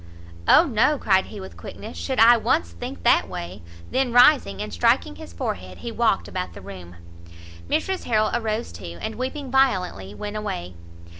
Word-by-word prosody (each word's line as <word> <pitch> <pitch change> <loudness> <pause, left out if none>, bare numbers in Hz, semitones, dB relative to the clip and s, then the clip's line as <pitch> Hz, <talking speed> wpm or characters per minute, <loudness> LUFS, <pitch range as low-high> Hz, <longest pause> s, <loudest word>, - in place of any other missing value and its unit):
"O 335 - +7
no!" 280 +2 +2
cried 190 -6 +2
he - - -9
with 95 -2 -9
quickness, 85 0 -9
"should 85 0 -3
I 230 +2 +8
once 85 - 0
think 85 +1 -8
that - - +4
way 90 +3 -7
" 85 0 -18
then 260 -2 +1
rising 245 - +5
and 105 -1 -5
striking 85 - +1
his - - -10
forehead, 90 +2 -5
he 235 - -6
walked 225 -3 +1
about 185 -1 -5
the - - -10
room. 90 -3 -10 0.7
Mrs 380 - -1
Harrel 215 -2 +2
arose 225 -1 -2
too, 85 0 -9
and - - -4
weeping 260 +1 -5
violently 180 - +1
went 210 - -5
away. 90 - -5
190 Hz, 175 wpm, -23 LUFS, -, 0.7 s, I